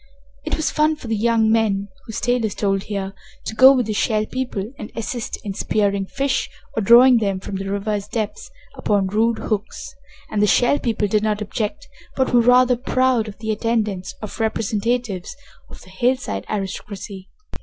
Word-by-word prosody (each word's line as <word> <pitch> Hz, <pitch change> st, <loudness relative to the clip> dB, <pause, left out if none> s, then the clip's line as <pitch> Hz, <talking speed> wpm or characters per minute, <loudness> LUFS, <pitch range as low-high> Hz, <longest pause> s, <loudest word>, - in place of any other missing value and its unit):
It -, -, -2 dB
was 315 Hz, -, -1 dB
fun 310 Hz, +1 st, +2 dB
for 300 Hz, -, -12 dB
the 225 Hz, -, 0 dB
young 220 Hz, 0 st, +2 dB
men 205 Hz, -3 st, +1 dB, 0.2 s
whose 225 Hz, 0 st, -4 dB
tale 245 Hz, -1 st, +1 dB
is 215 Hz, -3 st, -2 dB
told 195 Hz, -2 st, 0 dB
here 195 Hz, -2 st, -4 dB, 0.3 s
to -, -, -4 dB
go 260 Hz, +3 st, +9 dB
with 255 Hz, -3 st, +2 dB
the 215 Hz, -, -2 dB
Shell 215 Hz, 0 st, +1 dB
People 245 Hz, -3 st, -4 dB
and 215 Hz, -, -7 dB
assist 230 Hz, +1 st, -4 dB
in 200 Hz, -, -3 dB
spearing 200 Hz, -1 st, 0 dB
fish 275 Hz, +4 st, -1 dB, 0.3 s
or 220 Hz, -, 0 dB
drawing 240 Hz, +4 st, +7 dB
them 195 Hz, -3 st, -1 dB
from 195 Hz, +1 st, -5 dB
the 195 Hz, 0 st, -4 dB
river's 200 Hz, 0 st, -2 dB
depths 220 Hz, -, -4 dB, 0.3 s
upon 205 Hz, -2 st, +1 dB
rude 220 Hz, +4 st, +1 dB
hooks, 215 Hz, -1 st, -4 dB, 0.4 s
and 210 Hz, -, 0 dB
the 210 Hz, -, +4 dB
Shell 245 Hz, +7 st, +3 dB
People 220 Hz, -3 st, 0 dB
did 210 Hz, +1 st, +1 dB
not 210 Hz, -1 st, 0 dB
object, 220 Hz, +7 st, -4 dB, 0.3 s
but 260 Hz, -1 st, 0 dB
were 240 Hz, -, +6 dB
rather 250 Hz, +1 st, +5 dB
proud 255 Hz, -2 st, +1 dB
of 200 Hz, -2 st, -9 dB
the 220 Hz, +1 st, -3 dB
attendance 215 Hz, -4 st, -1 dB
of 215 Hz, -, -7 dB
representatives 220 Hz, -2 st, -1 dB, 0.3 s
of -, -, -12 dB
the 185 Hz, -, -16 dB
hillside 190 Hz, -, -1 dB
aristocracy. 195 Hz, -1 st, -5 dB
220 Hz, 180 wpm, -21 LUFS, 200-240 Hz, 0.4 s, go